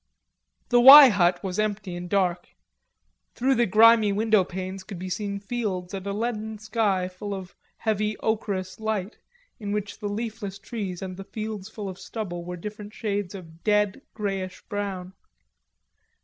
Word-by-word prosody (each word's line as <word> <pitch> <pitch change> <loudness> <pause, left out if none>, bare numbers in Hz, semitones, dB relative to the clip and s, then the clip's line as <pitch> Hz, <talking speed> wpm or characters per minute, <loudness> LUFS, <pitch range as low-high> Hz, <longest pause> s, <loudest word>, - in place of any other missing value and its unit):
The 245 - +5
"Y" 275 +2 +12
hut 180 -4 +2
was 190 0 -3
empty 205 -3 -2
and 175 0 -6
dark; 185 -3 +1 0.9
through 265 +2 +2
the 240 -2 +2
grimy 220 +1 +6
windowpanes 190 -3 0
could 195 -1 -8
be 185 +1 -6
seen 200 +1 -3
fields 200 -4 -3
and 195 0 -5
a - - -1
leaden 220 0 -3
sky 210 -4 0
full 200 +2 -6
of 190 -1 -8 0.2
heavy 215 -1 -1
ocherous 200 -4 -2
light, 220 -2 -3 0.4
in 205 -2 -4
which 205 -1 -3
the 205 -1 -3
leafless 210 -2 -4
trees 200 -3 -5
and 185 -1 -6
the 195 - -7
fields 215 0 -6
full 210 -2 -6
of 190 0 -7
stubble 185 -2 -5
were 180 +1 -6
different 210 +3 -8
shades 205 -3 -3
of 165 -3 -12
dead, 210 +2 +2
greyish 195 -3 -4
brown. 195 -3 -4
205 Hz, 155 wpm, -25 LUFS, 185-215 Hz, 0.9 s, Y